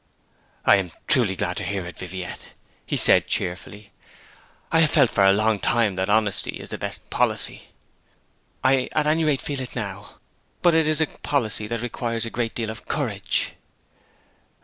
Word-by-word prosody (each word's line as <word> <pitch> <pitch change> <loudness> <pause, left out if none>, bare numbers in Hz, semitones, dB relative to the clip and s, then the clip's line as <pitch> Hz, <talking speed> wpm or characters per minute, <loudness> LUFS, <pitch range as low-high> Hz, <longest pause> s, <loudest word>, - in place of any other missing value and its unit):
'I - - +7
am 95 -3 -3
truly 120 -10 +3
glad 90 0 -2
to - - -3
hear 100 -3 -3
it, 90 - -8
Viviette,' 90 -1 -7 0.4
said - - +7
he - - -22
cheerfully. 95 +3 -3 0.8
'I 165 - +4
have 165 -2 +5
felt 145 -6 +4
for 100 - +2
a 95 - +7
long 110 +1 +2
time 115 -3 +2
that 95 +2 -2
honesty 105 -1 0
is - - -10
the - - -6
best - - -6
policy.' - - -1 1.0
'I 130 -1 +3
at 155 - +1
any 155 +2 +2
rate 150 -3 +1
feel 140 -2 -3
it 125 - -7
now. 105 -3 -6 0.5
But 175 - +5
it 160 -1 +3
is 155 0 +3
a - - +4
policy 110 -9 -2
that 115 0 -3
requires 115 -1 -2
a 115 - -6
great 115 -2 -2
deal 115 -2 -2
of 110 - -11
courage!' - - 0
110 Hz, 175 wpm, -23 LUFS, 100-135 Hz, 1.0 s, I